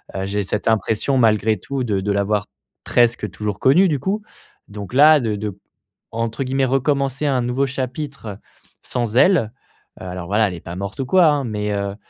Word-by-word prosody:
Heu, 95 Hz, 0 st, -2 dB
j'ai 100 Hz, +1 st, -1 dB
cette 100 Hz, +2 st, -3 dB
impression 110 Hz, +4 st, +1 dB
malgré 110 Hz, -2 st, +3 dB
tout 135 Hz, +6 st, -4 dB
de 105 Hz, -5 st, -1 dB
de 100 Hz, +2 st, -1 dB
l'avoir 100 Hz, +1 st, 0 dB, 0.4 s
presque 120 Hz, -3 st, +2 dB
toujours 105 Hz, -2 st, -4 dB
connu, 175 Hz, +9 st, +5 dB
du 145 Hz, -3 st, 0 dB
coup, 195 Hz, -, -2 dB, 0.5 s
donc 100 Hz, +1 st, -8 dB
là 150 Hz, +3 st, +7 dB
de 110 Hz, -5 st, -1 dB
de 100 Hz, -2 st, -5 dB, 0.5 s
entre 115 Hz, +3 st, -2 dB
guillemets 135 Hz, +1 st, 0 dB
recommencer 135 Hz, +1 st, 0 dB
«un 130 Hz, -3 st, +1 dB
nouveau 125 Hz, +3 st, 0 dB
chapitre» 130 Hz, -5 st, -5 dB, 0.5 s
sans 120 Hz, -2 st, -2 dB
elle, 140 Hz, -, +4 dB, 0.5 s
heu, -, -, -8 dB
alors 90 Hz, -1 st, -6 dB
voilà, 105 Hz, +3 st, +2 dB
elle -, -, -6 dB
est 85 Hz, -, -10 dB
pas 85 Hz, -, -8 dB
morte 100 Hz, +4 st, -6 dB
ou 130 Hz, -, -4 dB
quoi 185 Hz, +4 st, +5 dB
hein 145 Hz, -3 st, +1 dB
mais, 105 Hz, -2 st, -3 dB
heu, 100 Hz, 0 st, -3 dB
115 Hz, 190 wpm, -20 LUFS, 105-135 Hz, 0.5 s, là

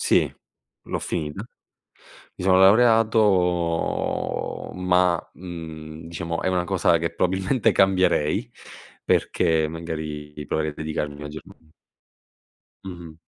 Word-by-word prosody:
Sì, -, -, +3 dB, 0.5 s
l'ho -, -, -4 dB
finita. 75 Hz, +2 st, -4 dB, 0.9 s
Mi -, -, -7 dB
sono 95 Hz, 0 st, +5 dB
laureato, 100 Hz, -5 st, +2 dB
ma, 90 Hz, -1 st, +1 dB
mhmm, 80 Hz, -3 st, -9 dB
diciamo 85 Hz, 0 st, -4 dB
è -, -, -1 dB
una 90 Hz, -1 st, +1 dB
cosa 90 Hz, -2 st, +2 dB
che 85 Hz, 0 st, -3 dB
probabilmente 95 Hz, +8 st, +1 dB
cambierei, 95 Hz, -6 st, +2 dB, 0.5 s
perché 80 Hz, -3 st, +2 dB
magari 75 Hz, -2 st, -6 dB
proverei 80 Hz, +2 st, -1 dB
a -, -, -13 dB
dedicarmi 75 Hz, -1 st, -4 dB
maggior 75 Hz, +1 st, -7 dB
manie 80 Hz, -1 st, -19 dB, 1.1 s
Mh-mh. 85 Hz, -4 st, -9 dB
85 Hz, 105 wpm, -24 LUFS, 80-95 Hz, 1.1 s, sono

